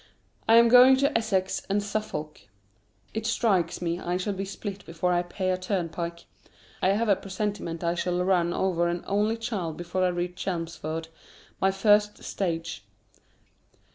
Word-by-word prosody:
I 225 - +8
am 235 0 +8
going 250 +2 +8
into 280 +2 +1
Essex 190 -4 0
and 200 +1 +1
Suffolk. 200 -8 -4 0.7
It 220 0 -2
strikes 195 -7 +1
me 170 0 -1
I 175 0 -1
shall 200 +3 -2
be 195 0 -4
spilt 200 0 -6
before 170 +2 -1
I 175 - +2
pay 185 +1 -2
a 185 - 0
turnpike. 170 -2 -3 0.6
I 190 - +3
have 225 +3 0
a 200 - +5
presentiment 190 -3 -4
I 170 0 +1
shall 180 0 -1
run 175 -2 +2
over 175 -2 +1
an 175 0 -2
only 210 +3 +1
child 205 -9 -3
before 175 +2 -2
I - - +4
reach 175 0 -2
Chelmsford, 165 -2 -4 0.5
my 190 - +4
first 210 +1 +3
stage. 165 - -3
185 Hz, 160 wpm, -27 LUFS, 170-205 Hz, 0.7 s, I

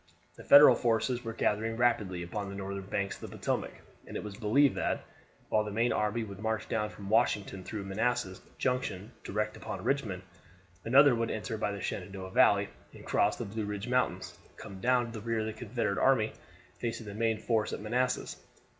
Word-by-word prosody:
The - - -12
Federal 145 +1 +9
forces 120 +1 0
were 115 - -4
gathering 115 0 0
rapidly 105 -7 +1
upon 100 +3 -4
the 100 - -7
northern 100 0 -5
banks 100 0 -2
of - - -7
the - - -10
Potomac, - - -1 0.4
and - - -5
it - - -5
was 105 -2 -7
believed 120 +6 +3
that, - - -1 0.4
while 110 - +3
the 105 - -5
main 115 +4 +1
army 105 +2 0
would 100 -3 -8
march 110 0 -2
down 105 -1 -1
from 100 - -10
Washington 100 -3 +1
through 105 +2 -5
Manassas 100 0 -1 0.2
Junction 120 -5 -2
direct 105 +1 -2
upon - - -6
Richmond, 110 -10 -1 0.6
another 135 +3 +6
would 115 -1 0
enter 110 +1 -3
by 105 -1 -1
the 100 -1 -5
Shenandoah 95 -1 -5
Valley, 100 +1 +4 0.3
and, - - -12
crossing - - +1
the 100 - -10
Blue 110 -1 -2
Ridge 105 +1 -4
Mountains, 95 -7 0 0.2
come 95 -1 -9
down 125 +2 +3
on 115 - -8
the 110 -2 -7
rear 115 0 -1
of - - -2
the 110 - -3
Confederate 110 -2 -2
army, 115 -5 +3 0.5
facing 115 -1 -3
the 100 - -7
main 115 +1 +1
force 110 -1 0
at - - -4
Manassas. 125 +4 -1
110 Hz, 195 wpm, -31 LUFS, 100-120 Hz, 0.6 s, Federal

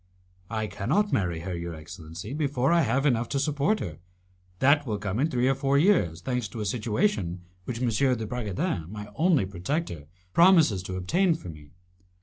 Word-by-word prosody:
"I 110 -1 -2
cannot 105 - 0
marry 85 -5 0
her, 90 +1 -4
your 85 -1 -5
excellency, 85 - -8
before 140 -2 0
I 170 - +5
have 135 0 +1
enough 120 -4 +2
to 140 - 0
support 150 +8 +1
her. - - -6 0.6
That 145 +5 +3
will 105 -2 -1
come 100 +1 -3
in 150 +4 +2
three 125 -3 +1
or 135 - +4
four 135 +1 +1
years, 140 - +3
thanks 125 +3 -2
to 110 +4 -8
a 105 - -2
situation 105 - -1 0.2
which 120 -2 -4
M. 120 - +2 0.3
de 110 - -4
Bragadin, 105 - -3
my 105 +1 -7
only 160 - +3
protector, 95 - -4 0.3
promises 165 - +5
to 95 0 -6
obtain 165 - +2
for 125 - -9
me. 75 -2 -12
115 Hz, 180 wpm, -27 LUFS, 95-145 Hz, 0.6 s, I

